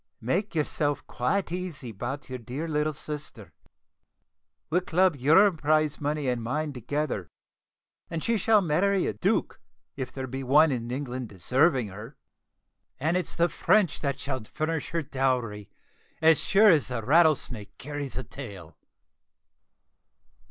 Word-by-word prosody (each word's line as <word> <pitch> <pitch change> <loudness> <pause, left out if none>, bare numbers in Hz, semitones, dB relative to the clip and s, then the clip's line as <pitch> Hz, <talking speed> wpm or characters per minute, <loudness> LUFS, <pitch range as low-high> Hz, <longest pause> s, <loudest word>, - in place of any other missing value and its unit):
Make 175 - -1
yourself 145 -2 -1
quite 180 +9 -1
easy 175 -9 -5
about 125 +7 -5
your 130 -1 -6
dear 130 +7 -5
little 150 0 0
sister. 150 0 -8 1.2
We'll 180 +3 +3
club 180 -1 +2
your 160 +10 +5
prize 155 -2 +1
money 145 -1 -1
and 125 -2 0
mine 145 +6 -2
together, 125 - -3 0.8
and 165 -1 -4
she 230 - +1
shall 215 +1 +4
marry 185 +3 +2
a - - -1
duke, 105 - -1 0.3
if 130 -2 -5
there 130 0 -5
is 135 +2 -5
one 150 +4 +5
in 120 -2 -3
England 130 -2 -4
deserving 130 - +2
her; 110 +8 -10 0.8
and 160 +6 +1
it's 180 -3 -1
the 170 - +3
French 180 +2 +2
that 140 -2 -2
shall 130 -4 -3
furnish 155 +6 -3
her 170 0 -1
dowry, 125 -7 -1 0.5
as 160 -1 +5
sure 210 +2 +6
as 155 -7 +4
the 125 -3 -3
Rattlesnake 130 -8 +2
carries 145 -1 -5
a 130 - -2
tail." 100 - -10
145 Hz, 140 wpm, -27 LUFS, 125-160 Hz, 1.2 s, sure